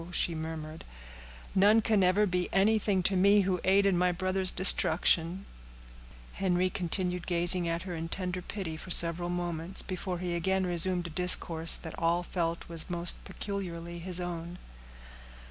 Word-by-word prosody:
she 175 -1 -1
murmured. 160 0 -7 0.7
"None 205 +3 +4
can 215 -2 +1
ever 185 +3 +2
be 180 -2 -2
anything 200 -1 +1
to 195 - +1
me 200 +2 +4
who 185 -2 -2
aid 195 +1 +3
in 195 -2 +2
my 180 +1 +1
brother's 185 +1 -1
destruction." 175 0 +3 0.9
Henry 185 -1 -1
continued 180 0 -3
gazing 175 0 +2
at 165 0 -3
her 185 -2 -7
in 165 0 -6
tender 180 0 -4
pity 180 -4 -6
for 165 - -11
several 170 0 +4
moments, 175 0 -2
before 185 -1 -5
he 175 0 -4
again 190 +2 -1
resumed 175 0 +2
a 170 - -7
discourse 165 -1 +4
that 160 - -9
all 170 +1 0
felt 170 -1 -4
was 165 0 -1
most 175 0 -3
peculiarly 175 -4 -6
his 180 +1 -2
own. 175 0 -6
180 Hz, 155 wpm, -29 LUFS, 170-190 Hz, 0.9 s, None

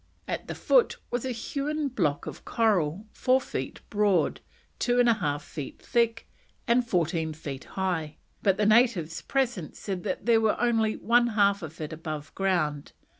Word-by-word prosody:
At - - -4
the - - -4
foot - - +3
was 245 +1 -1
a 260 - -1
hewn 285 +5 -2
block 170 - 0
of - - -8
coral, 200 -5 +1
four 255 +1 +2
feet 130 - -5
broad, 205 -3 +2 0.4
two 245 0 +2
and 245 - +5
a 235 - +6
half 145 -8 -2
feet 145 -4 -7
thick, 230 -1 0 0.4
and 245 +1 +4
fourteen 165 -6 0
feet 140 -3 -7
high, 175 -5 -2 0.2
but 195 -2 +3
the 210 - +2
natives 215 -7 +3
present 245 - -1
said 190 -3 -4
that - - -3
there 230 -1 +5
was 220 -1 +2
only 225 -2 +2
one 240 +1 +3
half 200 -1 +4
of 160 -1 -8
it 155 0 -5
above 155 -2 -6
ground. 175 -7 -1
205 Hz, 170 wpm, -27 LUFS, 160-235 Hz, 0.4 s, a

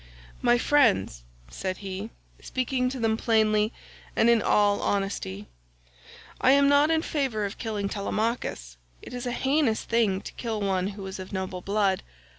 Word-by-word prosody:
"My 240 -1 +4
friends," 235 - +2 0.3
said 185 - -4
he, 195 +2 -6 0.3
speaking 255 0 -1
to 260 0 -5
them 225 -1 +1
plainly 215 -2 +2 0.4
and 235 - +5
in 230 -2 +4
all 205 -1 +3
honestly, 195 - -2 1.0
"I 260 - +6
am 280 0 +5
not 285 +2 +5
in 320 0 +2
favour 260 -8 -1
of 200 - -6
killing 210 -4 -2
Telemachus. 200 - -3 0.3
It - - -10
is 245 0 -4
a - - -1
heinous 265 -2 +1
thing 225 -5 +1
to - - -9
kill 225 -3 -3
one 190 -2 0
who 195 - -6
is 190 0 -6
of 185 0 -8
noble 190 -2 -4
blood. 200 -1 +1
215 Hz, 160 wpm, -26 LUFS, 195-245 Hz, 1.0 s, I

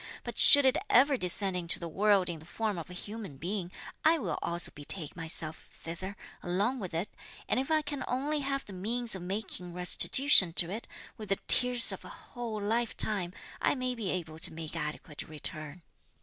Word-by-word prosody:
But - - -6
should 285 -1 +10
it 260 +2 +3
ever 275 +3 +5
descend 190 -2 0
into 170 -1 -1
the 170 - -6
world 195 +2 +2
in 170 -2 -4
the 155 - -15
form 210 +1 -3
of 165 - -9
a - - -9
human 200 -5 -8
being, 180 +3 -4 0.3
I 320 +2 +4
will 300 - -4
also 170 +1 -1
betake 150 +2 -5
myself 160 -1 -1
thither, 185 +4 -8 0.2
along 205 +9 -1
with 185 -5 -6
it; 170 +5 -2 0.4
and - - 0
if 270 - -3
I 310 -1 +2
can 290 -2 -5
only 290 +4 -1
have 275 -1 -3
the 200 - -11
means 230 +5 -2
of 190 - -5
making 180 -2 -5
restitution 180 +2 +5
to 175 +1 +3
it, 220 +4 -6 0.3
with 215 -3 -9
the 195 - +1
tears 250 -1 +5
of - - -8
a - - -11
whole 235 -4 -7
lifetime, 210 -3 -1 0.3
I - - +1
may 255 -1 -2
be 225 -6 -5
able 160 -4 -5
to - - +7
make 160 -1 -7
adequate 150 0 -6
return." 155 +1 -8
195 Hz, 190 wpm, -30 LUFS, 170-245 Hz, 0.4 s, should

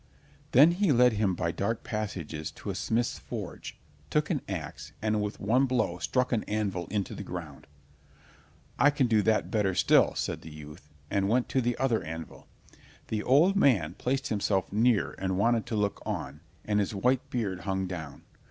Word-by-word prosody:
Then 145 +7 +7
he 185 -1 +2
led 125 -2 +5
him 100 -3 +1
by 85 -1 -1
dark 105 +6 -2
passages 95 - -4
to - - -6
a - - -6
smith's 120 +2 -1
forge, - - -7 0.3
took 150 +2 +1
an 150 - 0
ax, 80 -6 -6
and 110 -1 0
with 105 0 -4
one 125 +7 +2
blow 125 -1 0
struck 125 -1 0
an 115 -3 +1
anvil 100 -4 -2
into 100 -1 -2
the - - -6
ground. - - -8 1.1
"I 140 +4 +6
can 145 -2 +1
do 110 -3 +3
that 110 +1 +1
better 100 -4 +1
still," - - +4
said - - -3
the 80 - -10
youth, 75 0 -12 0.2
and 100 0 +1
went 120 +2 +1
to 130 - +1
the 120 0 -1
other 120 -6 +1
anvil. 80 -1 -8 0.6
The 110 -1 -1
old 155 - +4
man 105 - +3
placed 135 +7 -2
himself 100 -3 0
near 115 0 +2
and 95 -1 -1
wanted 115 +2 +2
to 115 - -2
look 105 -1 -1
on, 75 - -4 0.3
and 105 -1 +1
his 100 +1 -1
white 125 +5 +2
heard 100 -7 -2
hung 95 +1 -2
down. 80 -6 -7
105 Hz, 180 wpm, -29 LUFS, 95-125 Hz, 1.1 s, Then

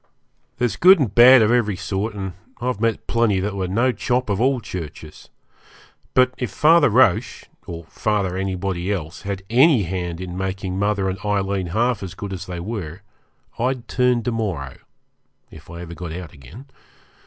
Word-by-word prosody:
There's 120 -4 -1
good 185 +2 +7
and 130 - -1
bad 120 +1 +8
of 105 - +2
every 110 -5 +2
sort, 100 +4 -3
and 95 -2 -5 0.3
I've 125 -3 -2
met 115 -1 0
plenty 115 -5 +1
that 100 +1 -3
were 95 -2 -2
no 120 +8 +2
chop 125 -2 -1
of 100 +2 -1
all 130 0 +2
churches; 80 -7 -9 0.9
but 130 0 +4
if 125 - -2
Father 155 - +4
Roche, 110 -5 +2 0.2
or 85 -1 -7
Father 100 +2 -2
anybody 95 -1 -2
else, 85 -3 -4
had 100 -1 -5
any 130 -1 +5
hand 90 -1 -4
in 90 -1 -6
making 95 0 -3
mother 100 -1 0
and 95 0 -3
Aileen 100 -2 -1
half 115 +5 0
as 95 -2 -7
good 100 0 -6
as 90 - -7
they 90 -1 -5
were, 90 -3 -6 0.6
I'd 125 0 -1
turn 125 -2 +1
to 120 - -1
morrow, 90 - -3 0.7
if 80 -1 -14
I 85 0 -8
ever 85 -1 -8
got 85 0 -7
out 85 -2 -8
again. 80 - -13
100 Hz, 175 wpm, -21 LUFS, 90-120 Hz, 0.9 s, bad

